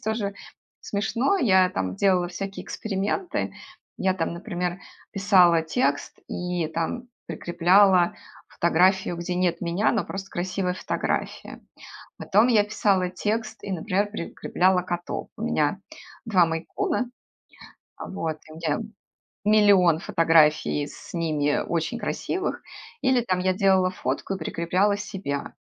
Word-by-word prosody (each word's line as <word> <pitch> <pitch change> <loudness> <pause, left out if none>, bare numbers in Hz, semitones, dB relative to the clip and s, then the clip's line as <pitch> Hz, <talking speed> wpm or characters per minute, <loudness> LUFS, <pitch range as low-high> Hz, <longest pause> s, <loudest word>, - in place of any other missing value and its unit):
тоже 215 -2 -2 0.5
смешно, 230 - 0
я 190 - +4
там 95 0 -3
делала 180 -3 +2
всякие 195 +2 -6
эксперименты. 210 - -3 0.4
Я 190 0 +1
там, 165 -3 -2
например, 175 +1 -3 0.3
писала 185 -5 +5
текст 140 -3 -1
и 180 -3 -2
там 165 +10 -3 0.2
прикрепляла 180 +1 +3 0.3
фотографию, 180 +1 +2
где 175 +1 -3
нет 180 -1 0
меня, 175 +4 +1
но 225 - 0
просто 195 0 -7
красивая 180 +1 -2
фотография. - - -3 0.6
Потом 215 +5 +3
я 220 -4 +4
писала 195 -3 +1
текст 215 +5 -3
и, 200 - -5
например, 200 +3 -1
прикрепляла 180 -1 0
котов. 175 -1 -4
У - - -8
меня - - 0 0.5
2 190 -6 +4
мейн-куна, 250 - -2 0.9
вот, 160 -5 -4
у 155 - -11
меня 160 -3 -1 0.7
миллион 200 -6 +5
фотографий 160 -6 +3
с - - -12
ними 155 -4 0
очень 170 +9 -2
красивых. 375 - -3 0.4
Или 260 -1 +3
там 185 -6 -1
я 185 0 +1
делала 190 -1 +3
фотку 195 +1 -3
и - - -5
прикрепляла 180 +5 +1
себя. 190 -9 -5
185 Hz, 120 wpm, -25 LUFS, 170-205 Hz, 0.9 s, писала